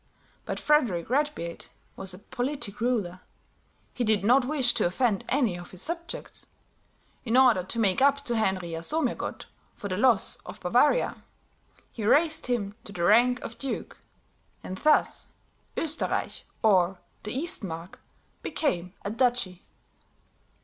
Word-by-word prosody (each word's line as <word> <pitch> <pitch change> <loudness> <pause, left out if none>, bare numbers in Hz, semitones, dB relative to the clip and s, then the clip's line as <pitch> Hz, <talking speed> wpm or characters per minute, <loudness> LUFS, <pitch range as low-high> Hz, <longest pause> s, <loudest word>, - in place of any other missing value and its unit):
But - - -3
Frederick 235 - +2
Redbeard 275 - -1 0.3
was 195 -1 -2
a 180 - -3
politic 245 +1 -4
ruler; 210 -8 0 0.7
he 250 - -2
did 215 -3 +3
not 250 +5 +4
wish 265 -3 +3
to - - +2
offend 210 +2 0
any 250 -9 +2
of 175 0 -9
his 185 - -9
subjects; 340 +8 -5 0.8
in 240 0 +1
order 250 -7 +6
to 185 +6 -6
make 205 -1 +2
up 280 +1 +3
to 240 - -1
Henry 190 -5 0
Jasomirgott 245 - -2 0.3
for 200 - -6
the 185 - -2
loss 245 +2 +3
of - - -11
Bavaria, - - +2 0.7
he 225 - -6
raised 310 +8 +3
him 215 -5 -1
to - - -10
the 175 -3 -4
rank 240 +6 +4
of 230 - -8
duke, 275 -2 -5 0.6
and 185 - -5
thus 305 0 +2 0.5
Oesterreich 315 -1 -1 0.2
or 190 -3 +4 0.2
the 210 - -6
Eastmark 195 - -3 0.4
became 185 - -2
a 200 - -2
duchy. 230 -6 0
230 Hz, 135 wpm, -27 LUFS, 185-265 Hz, 0.8 s, order